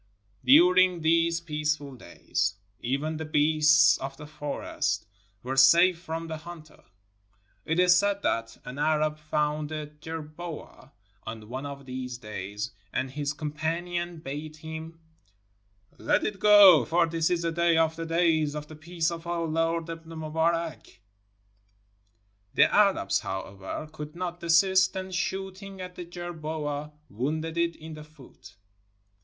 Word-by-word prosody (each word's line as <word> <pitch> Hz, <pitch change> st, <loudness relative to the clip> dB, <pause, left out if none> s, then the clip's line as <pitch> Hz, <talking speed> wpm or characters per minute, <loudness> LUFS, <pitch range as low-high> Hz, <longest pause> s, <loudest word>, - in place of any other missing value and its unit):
During 180 Hz, +6 st, +6 dB
these 165 Hz, +1 st, +3 dB
peaceful 150 Hz, -3 st, -2 dB
days, 100 Hz, -2 st, -3 dB, 0.2 s
even 140 Hz, +6 st, -2 dB
the 160 Hz, -, -4 dB
beasts 155 Hz, 0 st, +4 dB
of 135 Hz, 0 st, -6 dB
the 150 Hz, -, -9 dB
forest 145 Hz, -6 st, -3 dB, 0.4 s
were 130 Hz, +2 st, -3 dB
safe 170 Hz, +7 st, +6 dB
from 165 Hz, -1 st, -5 dB
the 160 Hz, -1 st, -5 dB
hunter. 155 Hz, -1 st, -12 dB, 0.8 s
It 160 Hz, +2 st, 0 dB
is 180 Hz, 0 st, +6 dB
said 200 Hz, +1 st, +1 dB
that 115 Hz, 0 st, -1 dB
an 125 Hz, +3 st, -7 dB
Arab 155 Hz, 0 st, +1 dB
found 150 Hz, 0 st, -1 dB
a 155 Hz, -1 st, -4 dB
jerboa 155 Hz, -1 st, -9 dB, 0.3 s
on 110 Hz, -1 st, -8 dB
one 130 Hz, +3 st, -5 dB
of 140 Hz, -1 st, -9 dB
these 125 Hz, -1 st, -5 dB
days, 105 Hz, 0 st, -6 dB, 0.2 s
and 130 Hz, 0 st, -2 dB
his 145 Hz, 0 st, -2 dB
com 150 Hz, -1 st, -5 dB
panions 170 Hz, +2 st, -3 dB
bade 150 Hz, +3 st, -6 dB
him, 160 Hz, +1 st, -8 dB, 1.0 s
''Let -, -, +1 dB
it 205 Hz, -2 st, -3 dB
go, 205 Hz, -2 st, +8 dB
for 170 Hz, +2 st, +2 dB
this 165 Hz, -1 st, 0 dB
is 175 Hz, -1 st, 0 dB
a 165 Hz, -, +1 dB
day 170 Hz, 0 st, +2 dB
of 160 Hz, 0 st, +2 dB
the 165 Hz, 0 st, -5 dB
days 165 Hz, -3 st, +2 dB
of 150 Hz, 0 st, -5 dB
the 155 Hz, -, -12 dB
peace 165 Hz, +1 st, -2 dB
of 170 Hz, 0 st, -7 dB
our 170 Hz, -1 st, -1 dB
Lord 165 Hz, +1 st, 0 dB
Ibn 165 Hz, 0 st, -8 dB
Mubarak." 160 Hz, -, -2 dB, 1.6 s
The -, -, +5 dB
Arabs, 195 Hz, -, +3 dB
however, 95 Hz, +8 st, -6 dB
could 150 Hz, 0 st, -8 dB
not 175 Hz, -1 st, -4 dB
desist, 185 Hz, +3 st, +4 dB
and 190 Hz, 0 st, -5 dB
shooting 190 Hz, +1 st, -4 dB
at 180 Hz, 0 st, -7 dB
the 180 Hz, -, -8 dB
jerboa, 155 Hz, -4 st, -5 dB, 0.2 s
wounded 155 Hz, +8 st, -3 dB
it 170 Hz, 0 st, 0 dB
in 160 Hz, 0 st, -10 dB
the 155 Hz, 0 st, -9 dB
foot. 150 Hz, -4 st, -16 dB
160 Hz, 145 wpm, -27 LUFS, 150-170 Hz, 1.6 s, go